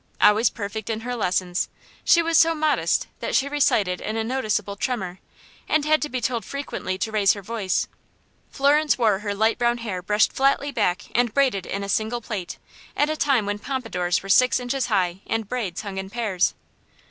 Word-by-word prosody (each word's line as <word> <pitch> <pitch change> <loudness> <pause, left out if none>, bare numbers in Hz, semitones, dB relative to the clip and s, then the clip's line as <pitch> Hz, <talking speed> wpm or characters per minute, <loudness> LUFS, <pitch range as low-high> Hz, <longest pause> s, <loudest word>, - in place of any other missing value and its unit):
Always 215 +2 +5
perfect 210 0 -6
in 220 -1 -2
her 245 +1 -4
lessons, 180 -4 -1 0.3
she 340 - +5
was 330 0 0
so 330 0 +5
modest 310 -1 +1
that - - -2
she 275 - +3
recited 215 -10 +1
in 215 +1 -3
a 225 - 0
noticeable 215 -5 -1
tremor, 195 -5 -3 0.5
and 305 -1 +2
had 310 0 +3
to 295 - -2
be 255 - -2
told 235 -1 -1
frequently 235 -8 -4
to 220 +3 -2
raise 205 -2 +4
her 200 - -8
voice. 205 -3 -1 0.6
Florence 295 +2 +3
wore 215 -5 +2
her 205 -1 -3
light 220 +4 +1
brown 240 0 +2
hair 210 -6 -4
brushed 210 +3 +2
flatly 275 +1 +2
back 205 -8 0
and 240 -1 +1
braided 255 -10 +2
in 200 0 -3
a - - -4
single 220 +4 0
plait, 205 -6 -5 0.4
at 295 +1 +2
a - - -1
time 275 -8 +2
when 205 0 -2
pompadours 205 -10 -2
were - - -8
six 255 +6 +5
inches 250 +1 -2
high 185 -5 0
and 225 -2 -2
braids 210 -8 -3
hung 195 -2 -5
in 190 0 -6
pairs. 210 -5 0
225 Hz, 195 wpm, -23 LUFS, 200-260 Hz, 0.6 s, Always